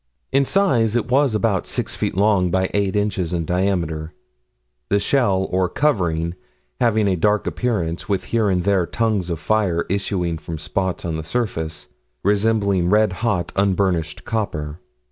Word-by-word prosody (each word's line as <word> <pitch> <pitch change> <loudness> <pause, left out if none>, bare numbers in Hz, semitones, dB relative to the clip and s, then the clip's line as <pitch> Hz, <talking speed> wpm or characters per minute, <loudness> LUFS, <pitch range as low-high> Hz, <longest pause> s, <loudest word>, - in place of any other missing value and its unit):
In 135 0 +3
size 125 - +2
it 120 +1 -1
was 135 -3 +3
about 105 -3 0
6 - - -2
feet - - -2
long 100 -3 +3
by 95 +1 0
8 100 -1 0
inches 100 -4 -1
in 85 -2 -1
diameter, 85 -3 -1 0.7
the 100 - +3
shell, 100 -4 +2
or 90 -1 +1
covering, 85 - 0 0.5
having 110 -3 +2
a 95 - +2
dark 105 +4 +1
appearance, 100 -8 -2
with 100 -2 0
here 110 -3 +1
and 90 -2 +1
there 95 -3 +2
tongues 110 -6 0
of 85 -2 -2
fire 95 -6 +1
issuing 90 -4 -1
from 80 +1 -6
spots 95 +5 -2
on 80 -2 -2
the 80 - -5
surface, 80 -6 -3 0.4
resembling 100 -3 +2
red 105 -1 +3
hot, 100 -8 0
unburnished 95 -4 0
copper. 75 -8 -3
95 Hz, 155 wpm, -21 LUFS, 85-110 Hz, 0.7 s, In